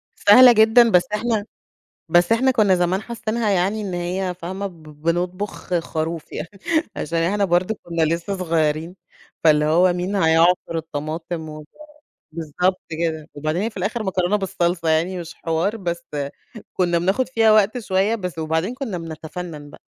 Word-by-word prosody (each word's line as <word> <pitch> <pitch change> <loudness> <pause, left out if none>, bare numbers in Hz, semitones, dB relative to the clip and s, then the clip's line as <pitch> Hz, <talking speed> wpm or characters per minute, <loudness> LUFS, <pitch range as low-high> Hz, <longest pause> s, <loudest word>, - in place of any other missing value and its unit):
سهلة 245 +5 +8
جدًا، 225 +1 +6
بس 180 -2 +5
إحنا 215 -1 -1 0.6
بس 175 +2 +4
إحنا 255 +3 +4
كنّا 210 -6 +3
زمان 180 +2 0
حاسّينها 225 -1 -2
يعني 195 +3 +1
إن 195 -3 -4
هي 180 +1 -2
فاهمة؟ 190 +3 -4
ب 170 -4 -15 0.2
بنطبخ 180 +2 -2
خروف 165 0 -4
يعني 170 - -5 0.5
عشان 165 +2 -2
إحنا 200 +5 +1
برضه 180 +4 +1
كنا 170 -1 -3
لسّه 170 +5 -1
صغيرين، 160 -1 -1 0.5
فاللي 150 -2 +4
هو 175 +4 +4
مين 180 +3 -3
هيعصر 165 -1 +3
الطماطم 160 +1 -5
و 155 0 -9 0.7
بالضبط 170 +4 -1
كده، 160 -1 -3
وبعدين 155 +5 -2
هي 225 - -1
في 220 - -12
الآخر 210 +5 -2
مكرونة 190 0 0
بالصلصة 175 -3 -1
يعني 170 +4 +1
مش 170 0 -8
حوار، 165 +7 -1
بس 170 -4 -4 0.7
كنا 175 -2 +1
بناخد 195 +9 0
فيها 225 -4 +4
وقت 215 +3 +3
شوية، 200 0 +1
بس 180 -6 -5
وبعدين 160 +7 -1
كنّا 250 -9 -4
بنتفنن 160 -1 -7
بقى - - -15
180 Hz, 155 wpm, -21 LUFS, 165-205 Hz, 0.7 s, سهلة